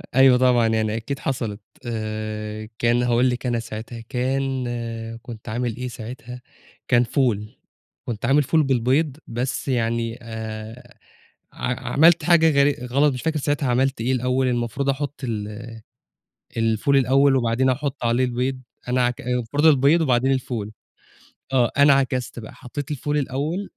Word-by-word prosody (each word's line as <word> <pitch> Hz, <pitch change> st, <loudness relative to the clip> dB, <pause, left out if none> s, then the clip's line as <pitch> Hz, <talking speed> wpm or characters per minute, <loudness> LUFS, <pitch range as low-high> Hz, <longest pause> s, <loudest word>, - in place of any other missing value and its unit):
أيوه 130 Hz, -1 st, +7 dB
طبعًا، 125 Hz, -2 st, +4 dB
يعني 110 Hz, -1 st, 0 dB
أكيد 115 Hz, +5 st, -4 dB
حصَلِت. 115 Hz, -6 st, -3 dB, 0.2 s
آآ، 110 Hz, -1 st, -4 dB
كان 120 Hz, +1 st, +2 dB
هاقول 125 Hz, +1 st, +3 dB
لِك، 125 Hz, +1 st, -3 dB
أنا 120 Hz, -2 st, 0 dB
ساعتها 115 Hz, +1 st, -7 dB
كان 130 Hz, 0 st, -1 dB, 0.5 s
كنت 115 Hz, -2 st, -9 dB
عامل 120 Hz, 0 st, -2 dB
إيه 125 Hz, +1 st, -4 dB
ساعتها، 125 Hz, +1 st, -8 dB, 0.5 s
كان 120 Hz, -1 st, +4 dB
فول، 115 Hz, -4 st, 0 dB, 0.6 s
كنت 115 Hz, -3 st, -4 dB
عامل 145 Hz, +2 st, +4 dB
فول 155 Hz, +3 st, +2 dB
بالبيض. 135 Hz, +3 st, +1 dB
بس 125 Hz, +4 st, -3 dB
يعني 115 Hz, -2 st, -1 dB
آآ، 110 Hz, 0 st, -8 dB, 0.6 s
ع 125 Hz, 0 st, -3 dB
عملت 165 Hz, +3 st, +5 dB
حاجة 170 Hz, -2 st, +5 dB, 0.2 s
غـر 140 Hz, -3 st, 0 dB
غلَط، 140 Hz, +3 st, +3 dB
مش 125 Hz, -, -5 dB
فاكر 160 Hz, -1 st, -1 dB
ساعتها 145 Hz, -2 st, 0 dB
عملت 130 Hz, 0 st, +1 dB
إيه. 125 Hz, -, 0 dB
الأوَّل 130 Hz, +1 st, +1 dB
المفروض 120 Hz, +2 st, -1 dB
أحُطّ 140 Hz, +1 st, -3 dB
ال 110 Hz, -1 st, -4 dB, 0.9 s
الفول 115 Hz, +5 st, +2 dB
الأوَّل 135 Hz, +1 st, +4 dB
وبعدين 125 Hz, +1 st, +2 dB
أحُطّ 135 Hz, +1 st, -2 dB
عليه 120 Hz, +2 st, +2 dB
البيض، 125 Hz, +1 st, -2 dB, 0.3 s
أنا 125 Hz, 0 st, +2 dB
عك 120 Hz, 0 st, -2 dB
المفروض 125 Hz, +4 st, -1 dB
البيض 150 Hz, +2 st, +5 dB
وبعدين 130 Hz, -3 st, +2 dB
الفول. 120 Hz, -5 st, -2 dB, 0.8 s
آه، 125 Hz, -3 st, +3 dB
أنا 140 Hz, 0 st, +7 dB
عكَسِت 130 Hz, -3 st, -1 dB
بقى، 110 Hz, -, -10 dB
حطِّيت 145 Hz, +3 st, -7 dB
الفول 145 Hz, +1 st, -1 dB
الأوَّل 150 Hz, +8 st, -2 dB
125 Hz, 145 wpm, -23 LUFS, 115-135 Hz, 0.9 s, أيوه